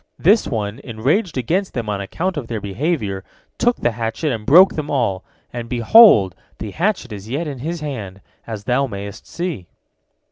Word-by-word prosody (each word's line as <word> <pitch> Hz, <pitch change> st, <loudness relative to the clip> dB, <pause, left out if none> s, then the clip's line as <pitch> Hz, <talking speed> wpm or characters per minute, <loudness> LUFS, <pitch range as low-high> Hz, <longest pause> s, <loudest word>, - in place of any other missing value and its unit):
This 205 Hz, +6 st, +4 dB
one, 105 Hz, -1 st, -3 dB
enraged 135 Hz, -, -1 dB
against 180 Hz, -, -1 dB
them 120 Hz, -3 st, -3 dB
on 100 Hz, -1 st, -2 dB
account 175 Hz, -, -3 dB
of 140 Hz, -6 st, -5 dB
their 115 Hz, -2 st, -3 dB
behavior, 105 Hz, -, -2 dB, 0.4 s
took 240 Hz, 0 st, +3 dB
the 120 Hz, -, 0 dB
hatchet 115 Hz, +7 st, -2 dB
and 110 Hz, -2 st, -6 dB
broke 180 Hz, +6 st, +7 dB
them 150 Hz, -1 st, -4 dB
all, 115 Hz, -9 st, 0 dB, 0.3 s
and, 120 Hz, -1 st, -6 dB
behold, 120 Hz, -, +6 dB, 0.2 s
the 110 Hz, -, -6 dB
hatchet 180 Hz, -, -1 dB
is 105 Hz, +1 st, -9 dB
yet 145 Hz, +7 st, -2 dB
in 140 Hz, -4 st, -6 dB
his 165 Hz, +5 st, -4 dB
hands, 110 Hz, -11 st, -5 dB, 0.3 s
as 110 Hz, -3 st, -6 dB
thou 130 Hz, +6 st, +1 dB
mayest 100 Hz, -1 st, -8 dB
see." 170 Hz, -, -4 dB
120 Hz, 175 wpm, -20 LUFS, 105-165 Hz, 0.4 s, broke